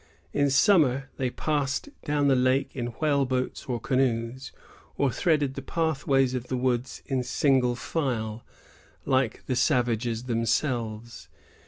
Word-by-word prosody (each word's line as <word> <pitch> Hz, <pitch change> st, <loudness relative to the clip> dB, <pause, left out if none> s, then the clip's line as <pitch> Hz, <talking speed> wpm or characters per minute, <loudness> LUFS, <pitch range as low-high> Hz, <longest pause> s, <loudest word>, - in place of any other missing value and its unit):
In 145 Hz, 0 st, +2 dB
summer, 140 Hz, -, +3 dB
they 130 Hz, -1 st, 0 dB
passed 145 Hz, -, -1 dB, 0.2 s
down 145 Hz, -1 st, +1 dB
the 135 Hz, -, +4 dB
lake 130 Hz, +2 st, +1 dB
in 120 Hz, -3 st, -2 dB
whale 145 Hz, -3 st, +2 dB
boats 130 Hz, -1 st, -2 dB
or 125 Hz, -2 st, -2 dB
canoes, 130 Hz, +1 st, -1 dB, 0.5 s
or 140 Hz, -2 st, +2 dB
threaded 150 Hz, -5 st, +1 dB
the 135 Hz, -, -6 dB
pathways 135 Hz, -4 st, +1 dB
of 125 Hz, -1 st, -4 dB
the 130 Hz, -, -2 dB
woods 125 Hz, 0 st, -1 dB
in 135 Hz, -2 st, -1 dB
single 125 Hz, -1 st, +2 dB
file, 120 Hz, -6 st, -3 dB, 0.6 s
like 130 Hz, -4 st, 0 dB
the 130 Hz, -, -1 dB
savages 120 Hz, -4 st, +1 dB
themselves. 115 Hz, -, -2 dB
130 Hz, 135 wpm, -27 LUFS, 120-140 Hz, 0.6 s, the